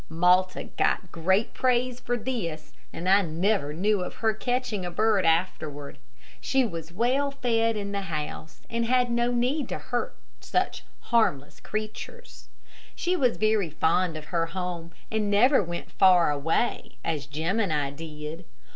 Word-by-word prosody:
Malta 180 +3 +3
got 185 - -1
great 190 +6 +1
praise 250 -1 +1
for 245 -1 -1
this, 205 -11 -4 0.2
and 175 - -5
I 195 +2 +6
never 175 -1 0
knew 200 +5 +1
of - - -6
her 220 -1 +1
catching 245 -3 -2
a 175 - -3
bird 205 0 +2
afterward. 150 -4 -1 0.4
She 265 -1 +2
was 165 -5 -6
well 250 +9 +1
fed 230 -4 +1
in 200 -1 -4
the 200 0 -2
house, 155 -3 -5
and 230 0 -1
had 250 0 +3
no 235 +1 +1
need 250 +3 0
to - - -2
hurt 245 -1 -3 0.2
such - - -1 0.3
harmless 145 -12 +2
creatures. 215 - -7 0.5
She 360 +1 0
was 255 -8 +2
very 215 -5 +2
fond 160 +2 +1
of 155 - -8
her 165 -1 +1
home, 175 -1 -5 0.2
and 215 -2 0
never 245 +7 +5
went 175 -2 -6
far 180 -4 +5
away, 160 +11 -1
as 155 -4 -2
Jim 160 +9 -1
and 200 -7 +1
I 145 -2 0
did. 155 +2 -8
195 Hz, 155 wpm, -27 LUFS, 165-235 Hz, 0.5 s, I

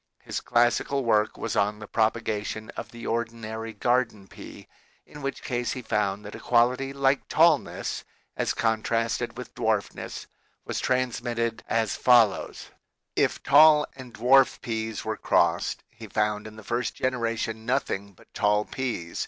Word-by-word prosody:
His - - -4
classical 120 +3 +1
work 110 -1 +2
was 115 - -3
on 105 +2 +1
the 105 - -9
propagation 110 -1 -1
of 115 - -7
the 120 0 -11
ordi 115 0 -1
nary 110 0 -6
garden 115 -2 0
pea, - - -12 0.4
in 150 - -12
which 140 -1 -4
case 120 -1 -2
he 125 - -6
found 105 -2 -1
that 105 - -8
a - - -8
quality 125 +3 +2
like 135 0 +1
tallness, 160 -2 +2 0.3
as - - -1
contrasted 115 0 0
with - - -8
dwarfness, - - -2 0.4
was - - -3
trans 125 -1 0
mitted 115 -1 -2
as 115 -2 +1
follows: 120 -5 +3 0.4
If - - +1
tall 150 +1 +7
and 130 -2 -11
dwarf 130 +4 +4
peas 110 -2 -4
were - - -2
crossed, - - +1
he 115 -1 -11
found 105 +1 -1
in 110 - -11
the 110 - -11
first 120 +3 -2
generation 115 -3 -2
nothing 100 -6 -1
but - - -22
tall 105 0 +2
peas. 115 -11 -4
115 Hz, 155 wpm, -26 LUFS, 110-125 Hz, 0.4 s, tall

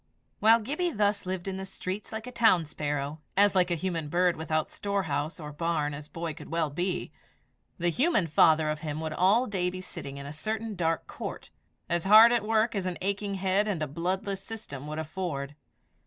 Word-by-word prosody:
While 225 +2 +6
Gibbie 300 +10 -1
thus 205 - 0
lived 185 0 -3
in 190 -1 -3
the 190 - -5
streets 190 +1 -5
like 220 +1 -5
a 250 - -7
town 225 -9 +4
sparrow 145 0 -3 0.2
as 205 0 +5
like 185 -2 +3
a 175 - +1
human 165 -3 -3
bird 175 +2 +3
without 155 0 -1
storehouse 165 -7 -2
or 150 -2 -7
barn 150 -1 -1
as 145 +1 -7
boy 165 0 -4
could - - -11
well 160 -2 0
be 175 +4 -2 0.7
the 175 0 +1
human 255 - +2
father 155 0 +4
of 155 - -4
him 150 -1 -4
would 160 -1 -3
all 200 +9 +4
day 185 -5 -1
be 185 +1 -6
sitting 140 -6 -7
in 140 - -7
a 145 - -6
certain 220 +7 -3
dark 165 -2 0
court, - - -7 0.4
as 170 0 -1
hard 220 +4 +9
at 240 -3 +2
work 220 +1 +2
as 195 -3 -2
an 180 - -3
aching 200 +1 -2
head 195 +2 +1
and 180 -7 -1
a - - -2
bloodless 185 +6 -2
system 150 - -8
would 155 +1 -5
afford. 160 -3 -4
180 Hz, 200 wpm, -28 LUFS, 155-205 Hz, 0.7 s, hard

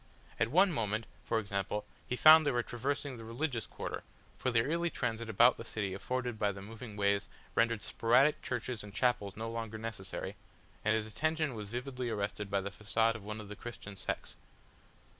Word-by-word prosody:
At 115 - +4
one 185 +7 +5
moment, 110 -5 -1 0.2
for - - 0
example, 100 -1 -2 0.2
he 125 - -1
found 155 +4 +9
they 145 - +2
were 120 -1 +1
traversing 135 +3 -2
the 115 - -8
religious 115 +1 -2
quarter, - - -5 0.3
for 130 - -1
the 115 -1 +3
easy 170 +3 +1
transit 115 -5 -2
about 120 +4 +6
the - - -6
city 105 -4 -3
afforded 125 +3 -2
by 105 -1 +2
the 100 - -8
moving 110 0 -8
ways 100 0 +2 0.3
rendered 115 -2 +2
sporadic 130 +6 +4
churches 125 -2 -3
and 105 0 -10
chapels 120 -6 +1
no 110 +1 -3
longer 115 -1 -4
necessary 110 -4 -5 0.5
and 110 +1 +3
his 110 -1 0
attention 155 +5 0
was 105 -3 -6
vividly 125 +1 -3
arrested 105 -1 -2
by 100 0 +1
the 100 +1 -4
façade 110 +3 +1
of 110 -3 -8
one 105 +1 -5
of 105 - -8
the 105 - -7
Christian 105 -3 -8
sects. - - -4
115 Hz, 190 wpm, -33 LUFS, 105-125 Hz, 0.5 s, found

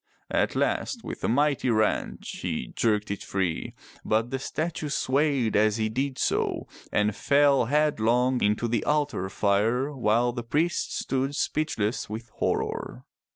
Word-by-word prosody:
At - - +1
last - - -1
with - - -7
a - - +2
mighty 140 +1 +2
wrench 110 -2 0
he - - -3
jerked 105 -3 +1
it 100 - -4
free, 95 -4 -2 0.3
but 110 +3 0
the 135 - -1
statue 155 +2 -3
swayed 135 -4 +1
as 105 +1 +3
he 110 -1 0
did 130 +4 -2
so - - 0 0.2
and 105 0 +1
fell 140 -3 +4
headlong 125 -3 +2
into 105 +3 +1
the 115 -2 0
altar 145 -10 0
fire 110 +9 +1
while 120 0 +2
the 120 0 -4
priests 150 +9 0
stood 135 +2 -1
speechless 120 -12 -1
with 110 +2 -6
horror. - - -2
120 Hz, 145 wpm, -26 LUFS, 110-140 Hz, 0.3 s, fell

